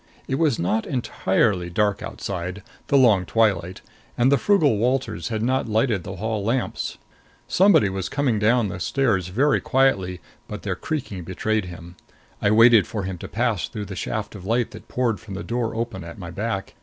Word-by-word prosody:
It 135 - -1
was 155 -7 +2
not 105 +6 0
entirely 95 -7 0
dark 105 +3 0
outside 90 +1 -5 0.2
the 140 - +4
long 110 -8 +5
twilight 95 -4 +1 0.4
and 125 +3 +4
the 140 - +5
frugal 150 - +3
Walters 115 -7 0
had 110 -1 -2
not 130 -1 0
lighted 110 -3 +1
the 95 - -6
hall 110 +1 -2
lamps. 120 +4 -2 0.5
Somebody 190 - +5
was 95 -1 -3
coming 135 -5 0
down 110 0 +3
the 95 - -6
stairs 105 -4 +1
very 135 +10 +2
quietly 100 -9 +1 0.3
but - - -7
their - - -2
creaking 120 - -4
betrayed 105 +4 -1
him. 85 0 -10 0.4
I - - +3
waited 115 0 +6
for 105 -3 -4
him 95 -2 -5
to - - -7
pass 115 -4 -1
through 105 -1 -6
the 95 - -7
shaft 110 +3 -4
of 100 -4 -10
light 115 +4 0
that - - -12
poured 120 -5 0
from 100 -1 -9
the 100 - -5
door 115 -2 -2
open 115 -5 -3
at 85 0 -9
my 85 -4 -7
back. 100 +1 -3
110 Hz, 185 wpm, -23 LUFS, 95-120 Hz, 0.5 s, waited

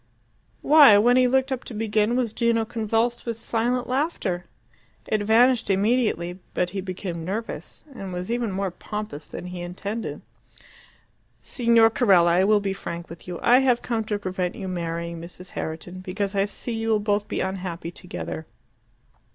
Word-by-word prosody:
Why, 290 -8 +8
when 240 +4 +5
he 255 0 +5
looked 265 +1 +2
up 260 -2 -2
to 235 - -8
begin, 215 +1 +1
was 240 -4 0
Gino 230 -1 +1
convulsed 225 +1 -1
with 230 -2 -3
silent 240 +2 -1
laughter? 250 - -1 0.6
It 215 - 0
vanished 230 +2 +4
immediately; 195 -4 +1 0.2
but 180 0 0
he 195 0 -3
became 185 -3 -5
nervous, 210 +6 -5
and 195 -6 -7
was 180 +4 -4
even 235 -3 -1
more 190 0 -2
pompous 210 -5 -6
than - - -7
he 180 -1 -6
intended. 200 +6 -5 1.2
"Signor 230 -2 +4
Carella, 190 -8 +4
I 180 +2 +4
will 210 0 +4
be 200 -1 -2
frank 170 -3 -7
with 165 - -11
you. 175 -1 -4
I 245 +2 +6
have 255 -3 +2
come 230 -2 -1
to 210 -1 -1
prevent 185 -2 -3
you 190 - -6
marrying 170 -1 -4
Mrs. 180 +2 -9
Herriton, 165 +3 -5
because 195 +2 -3
I 195 0 +2
see 230 +3 -5
you 225 0 -2
will 220 -1 +3
both 205 0 0
be - - -3
unhappy 180 -3 -4
together. 165 -3 -6
205 Hz, 165 wpm, -24 LUFS, 180-230 Hz, 1.2 s, Why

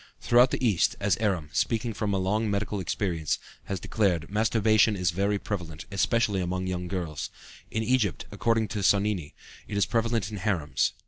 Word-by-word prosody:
Throughout 120 +2 +5
the 130 - -1
East, 100 -7 +2
as 100 0 +2
Eram, 95 -8 -1
speaking 115 0 0
from 105 -1 -2
a 100 - +1
long 105 +4 0
medical 100 0 -1
experience, 85 -4 -1 0.3
has 100 -2 -3
declared, 90 -6 0
masturbation 110 0 +3
is 90 -3 +1
very 100 +4 +1
prevalent, 90 -6 -5
especially 100 0 +1
among 90 +1 -2
young 90 -1 -3
girls. 85 -6 -4 0.4
In 110 - -1
Egypt, 115 -6 +1
according 115 -1 +1
to 105 - -3
Sonnini, 100 -4 +1 0.3
it 100 - -3
is 100 - +3
prevalent 115 -3 0
in 105 - -5
harems. 85 - 0
100 Hz, 170 wpm, -27 LUFS, 90-110 Hz, 0.4 s, Throughout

